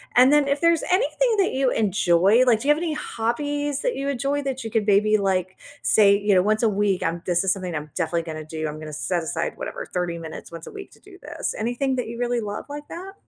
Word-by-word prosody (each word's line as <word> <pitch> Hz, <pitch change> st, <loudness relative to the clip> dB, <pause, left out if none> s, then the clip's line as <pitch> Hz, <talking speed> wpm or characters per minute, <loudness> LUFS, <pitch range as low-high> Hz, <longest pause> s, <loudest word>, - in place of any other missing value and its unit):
and 255 Hz, +2 st, +7 dB
then 295 Hz, -1 st, +4 dB
if 280 Hz, +1 st, 0 dB
there's 335 Hz, -1 st, +3 dB
anything 470 Hz, +4 st, +2 dB
that 380 Hz, -, +2 dB
you 265 Hz, -1 st, +1 dB
enjoy, 200 Hz, +2 st, +3 dB
like, 235 Hz, -4 st, +4 dB
do 275 Hz, -, -4 dB
you 295 Hz, -, +7 dB
have -, -, -4 dB
any 325 Hz, -3 st, -1 dB
hobbies 290 Hz, +2 st, -2 dB
that -, -, -1 dB
you 275 Hz, +1 st, -2 dB
enjoy? 280 Hz, +2 st, -1 dB
That 265 Hz, -2 st, -3 dB
you 225 Hz, -, -5 dB
could, 220 Hz, -1 st, 0 dB
maybe, 210 Hz, +1 st, +4 dB
like, 190 Hz, -2 st, -1 dB, 0.2 s
say, 200 Hz, -2 st, +5 dB
you 205 Hz, -1 st, +2 dB
know, 185 Hz, -, +5 dB
"Once 215 Hz, +2 st, +1 dB
a 225 Hz, -, +4 dB
week, 200 Hz, -2 st, 0 dB
um, 170 Hz, +1 st, -2 dB
this 175 Hz, 0 st, +1 dB
is 190 Hz, -, +2 dB
something 185 Hz, -3 st, -3 dB
I'm 150 Hz, 0 st, -5 dB
definitely 170 Hz, -1 st, -1 dB
gonna 155 Hz, -1 st, -7 dB
do, 155 Hz, 0 st, -4 dB
I'm 150 Hz, 0 st, -6 dB
gonna 155 Hz, -1 st, -8 dB
set 170 Hz, +3 st, -1 dB
aside," 160 Hz, -, -3 dB
whatever -, -, -6 dB
"30 175 Hz, -2 st, -2 dB
minutes 160 Hz, -1 st, -9 dB
once 165 Hz, -1 st, -9 dB
a -, -, -8 dB
week 400 Hz, -1 st, -10 dB
to -, -, -19 dB
do -, -, -16 dB
this." -, -, -4 dB
Anything 245 Hz, +4 st, -1 dB
that 250 Hz, -, -3 dB
you 235 Hz, +1 st, -7 dB
really 245 Hz, -1 st, 0 dB
love 205 Hz, -1 st, -5 dB
like 290 Hz, +1 st, -7 dB
that? 375 Hz, +3 st, -8 dB
220 Hz, 255 wpm, -23 LUFS, 180-280 Hz, 0.2 s, and